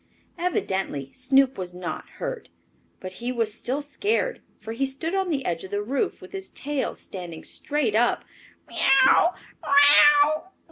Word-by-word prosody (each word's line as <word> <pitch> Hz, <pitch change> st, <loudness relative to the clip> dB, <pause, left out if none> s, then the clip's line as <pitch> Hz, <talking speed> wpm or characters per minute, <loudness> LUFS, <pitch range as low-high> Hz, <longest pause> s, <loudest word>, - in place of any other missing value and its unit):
Evidently 190 Hz, -, -2 dB
Snoop 265 Hz, -1 st, +2 dB
was 180 Hz, -1 st, -5 dB
not 180 Hz, 0 st, -6 dB
hurt. -, -, -5 dB, 0.5 s
But 185 Hz, -, -7 dB
he 245 Hz, +1 st, -2 dB
was 230 Hz, -4 st, -1 dB
still 265 Hz, +5 st, -3 dB
scared, 425 Hz, +11 st, -1 dB, 0.2 s
for 220 Hz, -, -8 dB
he 235 Hz, +4 st, -2 dB
stood 275 Hz, +6 st, -3 dB
on 385 Hz, -1 st, 0 dB
the 275 Hz, -5 st, -2 dB
edge 170 Hz, -1 st, -2 dB
of 190 Hz, -, -8 dB
the 205 Hz, +1 st, -2 dB
roof, 275 Hz, -, -2 dB
with -, -, -12 dB
his 385 Hz, -1 st, -5 dB
tail 285 Hz, -1 st, -3 dB
standing 175 Hz, -4 st, -8 dB
straight 290 Hz, -7 st, -2 dB
up. 240 Hz, +2 st, +2 dB, 0.4 s
"Meow! 270 Hz, +6 st, +4 dB
265 Hz, 145 wpm, -24 LUFS, 205-295 Hz, 0.5 s, Meow